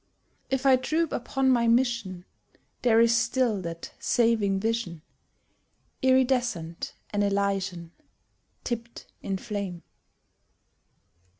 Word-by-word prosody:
If 265 0 -1
I 265 -1 +6
droop 315 +5 0
upon 265 +2 0
my 235 -2 +3
mission, 230 -7 +1 0.6
There 230 -2 +4
is 230 0 +5
still 230 -2 +1
that 170 -1 -7
saving 220 -5 +2
vision, 220 -7 -2 1.0
Iridescent 250 -10 +1 0.2
and 205 0 +1
Elysian, 195 -4 -1 0.7
Tipped 235 -1 -5 0.2
in 195 - -2
flame. 200 -5 -5
230 Hz, 95 wpm, -27 LUFS, 195-250 Hz, 1.0 s, I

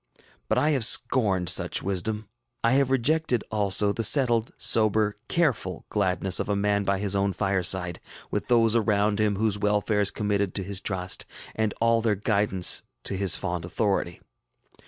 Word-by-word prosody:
But - - +1
I 150 +5 +2
have 135 -5 0
scorned 100 -6 +2
such - - +1
wisdom. 100 +3 -3 0.4
I 115 - +2
have 135 0 +2
rejected, 135 -1 +1
also, 100 -1 +2
the 115 - -3
settled, 120 -1 +3
sober, 110 -1 +3
careful 125 - -1
gladness 95 -2 +1
of - - -4
a 100 - 0
man 100 0 0
by 100 0 0
his 100 0 -2
own 100 0 0
fireside, 95 -2 0 0.3
with - - -3
those 115 -2 +3
around 105 -1 +1
him 105 -1 +1
whose 105 0 0
welfare 105 0 0
is 100 - +3
committed 100 -2 -2
to 95 - -2
his 100 +1 -4
trust 95 -2 -3 0.3
and 110 -1 -1
all 115 0 +2
their 110 -2 0
guidance 100 -2 +1 0.2
to 100 - -2
his 95 -2 +2
fond 90 -3 -4
authority. 90 -1 -2
105 Hz, 165 wpm, -25 LUFS, 95-110 Hz, 0.4 s, settled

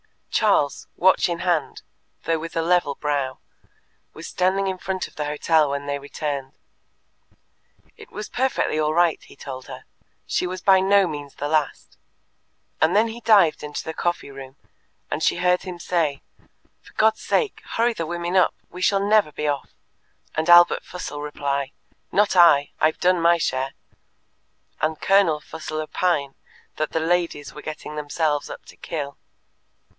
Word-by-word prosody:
Charles, 200 -10 +1
watch 185 0 +3
in 170 -1 -2
hand, 175 -4 -1 0.4
though 165 0 0
with 165 +1 -7
a 165 - +1
level 170 -4 +2
brow, 140 -3 -2 0.8
was - - -10
standing 190 +2 +1
in 190 -1 -2
front 190 0 -3
of - - -20
the 150 - -3
hotel 150 +1 +2
when 140 0 -3
they 140 0 -2
returned. 140 -1 -5 1.4
It 435 -1 -13
was 210 0 -6
perfectly 255 -11 0
all 155 0 +1
right, 170 -2 +3
he - - -16
told 130 -2 -8
her; - - -9 0.4
she 180 - -1
was 185 +1 -5
by 190 -1 +5
no 195 +1 +4
means 145 -4 -6
the 145 - -3
last. 155 -2 -2 0.8
And 160 +4 +3
then 220 +2 +4
he 235 +2 -8
dived 200 -9 +4
into 150 0 -5
the 160 - -5
coffee 175 -5 -2
room, 135 -1 -10 0.6
and 155 - -2
she - - +2
heard 180 0 +2
him 180 -2 -7
say, 165 -5 -1 0.6
"For - - -19
God's 220 0 +2
sake, 450 -4 0
hurry 235 +1 +2
the 165 -7 -4
women 175 +1 -3
up; 185 -2 +4 0.2
we 180 - -9
shall 195 +2 +2
never 210 -6 +3
be 150 +1 -3
off," 145 -2 -3 0.6
and 160 +2 -1
Albert 175 0 +7
Fussell 165 -5 -7
reply, 140 -2 -3 0.4
"Not 205 -1 +2
I; 155 -5 +6
I've 155 0 +2
done 180 -1 +3
my 170 +1 +5
share," 135 -4 -2 1.1
and 155 0 0
Colonel 195 -6 +3
Fussell 155 -1 -6
opine 155 -3 -1 0.4
that 155 - -2
the 160 - 0
ladies 170 -3 -1
were 150 - -9
getting 155 -1 -7
themselves 150 0 -1
up - - -9
to - - -14
kill. 145 -4 -6
165 Hz, 165 wpm, -23 LUFS, 145-185 Hz, 1.4 s, Albert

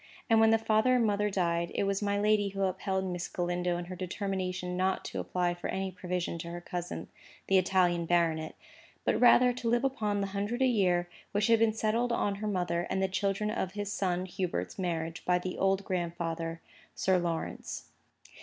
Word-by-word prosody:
And 225 - +6
when 225 0 +6
the 225 - +5
father 225 +3 +3
and 240 -2 +3
mother 210 0 +1
died, 170 -3 0
it - - +1
was 195 0 0
my 200 -1 +1
lady 205 0 +3
who 195 0 -2
upheld 190 0 -1
Miss 180 -2 -3
Galindo 175 0 -1
in 175 - -4
her 185 +1 -7
determination 185 -1 -3
not 185 +1 0
to - - -4
apply 180 -1 0
for 175 - -5
any 190 0 -2
provision 180 -2 -3
to 170 - -6
her 175 0 -5
cousin, 175 0 -5 0.4
the 195 -1 +4
Italian 175 -2 +2
baronet, 165 -2 +1 0.5
but - - +1
rather 245 0 +7
to 240 -1 -2
live 240 +2 +2
upon 215 -6 0
the 200 - 0
hundred 205 +6 -1
a - - +6
year 185 -8 +2 0.3
which 205 0 +2
had 230 -1 +4
been 225 -1 +3
settled 225 +2 0
on 205 -3 +1
her 215 - -2
mother 175 -3 -1
and 190 - 0
the 190 - +2
children 195 +2 -1
of 190 -4 -2
his 205 0 -3
son 180 -1 0
Hubert's 185 +1 -3
marriage 165 -2 -2
by 180 0 +3
the 180 +1 -4
old 195 0 +2
grandfather, 170 -2 -3 0.3
Sir 190 -1 +2
Lawrence. 170 -2 -3
190 Hz, 195 wpm, -30 LUFS, 175-210 Hz, 0.5 s, rather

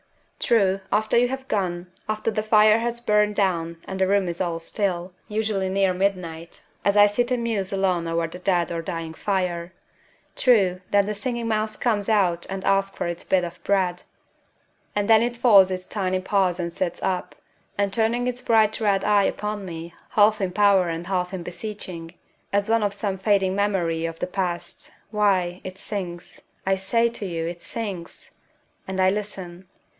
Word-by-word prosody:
True, 195 -4 +2
after 215 +1 +1
you 240 +1 +5
have 265 +1 -5
gone, 180 -4 -2 0.2
after 215 +1 -1
the 215 - -1
fire 215 0 +5
has 235 +1 -2
burned 210 -2 +2
down 170 -4 0
and 190 - -5
the 190 - +4
room 200 -1 +2
is 170 +1 -3
all 170 -2 -1
still 180 0 -2
usually 210 -3 -1
near 190 -1 +2
midnight, 180 -4 -3 0.2
as 200 +1 +2
I 205 - +9
sit 240 +4 +1
and 250 -2 0
muse 210 -5 -1
alone 185 -3 0
over 165 0 0
the 170 +3 -9
dead 180 -2 +1
or 165 -1 -2
dying 165 -2 -5
fire 180 -2 -2 0.6
true, 195 -8 +3
then 200 -1 +3
the 210 - -2
Singing 235 +3 -3
Mouse 215 -1 -1
comes 215 -4 0
out 180 -6 +2
and 190 0 -4
asks 195 0 +2
for - - -2
its 170 0 -4
bit 185 -1 +2
of 170 - -7
bread; 185 -3 +1 0.9
and 205 -1 0
then 225 -1 +6
it 240 0 -1
folds 205 -6 +6
its 185 -1 -4
tiny 185 -3 -1
paws 185 -2 +1
and 170 -1 -3
sits 175 -1 -3
up, 185 -1 -2 0.4
and 200 -1 0
turning 230 +3 +1
its 250 0 -2
bright 225 -3 +3
red 200 -2 +2
eye 205 -1 +4
upon 210 -1 -2
me, 170 -2 -7 0.2
half 215 0 +4
in 190 -2 0
power 195 -2 +4
and 165 +1 -4
half 180 -1 -1
in 185 -3 -5
beseeching, 180 -3 -7 0.4
as 200 0 +1
of 210 -3 +2
some 200 -2 -2
fading 195 -2 +2
memory 175 -5 0
of 165 0 -7
the - - -3
past 180 -2 -4 0.2
why, 190 -4 +1
it 185 0 -7
sings, 180 -4 -6 0.2
I 195 0 +3
say 230 +5 +1
to 230 -3 -6
you; 165 -2 -3
it 170 +1 -5
sings! 195 -7 -6 0.6
And 190 0 -4
I 185 0 +4
listen.... 190 -3 -6
195 Hz, 180 wpm, -24 LUFS, 180-210 Hz, 0.9 s, I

